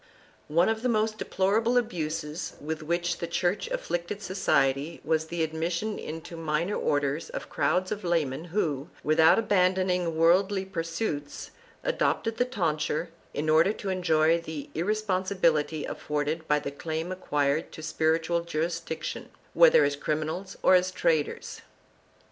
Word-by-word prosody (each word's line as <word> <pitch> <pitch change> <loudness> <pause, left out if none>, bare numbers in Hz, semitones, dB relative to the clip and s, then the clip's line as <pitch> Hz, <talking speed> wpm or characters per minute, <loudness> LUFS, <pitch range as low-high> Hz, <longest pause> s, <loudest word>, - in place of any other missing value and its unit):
2 150 - -9
One 170 +2 +5
of 220 0 0
the 250 - 0
most 215 -1 +1
deplorable 220 +6 +1
abuses 165 -7 -2
with 155 +1 -4
which 170 +2 -1
the 170 - -3
Church 175 - 0
afflicted 200 - -3
society 160 -6 +1
was 160 0 0
the 170 0 -1
admission 170 +6 -2
into 160 +2 -7
the 165 - -7
minor 160 +5 0
orders 145 -1 0
of - - -6
crowds 175 +6 +1
of 210 -1 -3
laymen 160 -4 0
who, 160 -5 -1
without 160 +1 +5
abandoning 185 -5 +2
worldly 190 +4 +3
pursuits, 165 -4 -4 0.3
adopted 230 - 0
the 245 - +2
tonsure 165 -7 -1 0.3
in 150 - -2
order 160 +6 +4
to 205 - -5
enjoy 165 -3 +2
the 160 -3 -7
irresponsibility 185 -5 0
afforded 150 +2 -3
by 150 - +3
the 145 -1 -4
claim 160 +4 -4
acquired 150 -4 0
to 155 - -9
spiritual 160 +2 +1
jurisdiction, 165 -1 -3 0.2
whether - - +7
as 145 0 +1
crimin 155 +2 -1
als 190 +4 -6
or - - +6
as 185 0 +4
traders. 165 -5 -1
170 Hz, 145 wpm, -27 LUFS, 155-190 Hz, 0.3 s, whether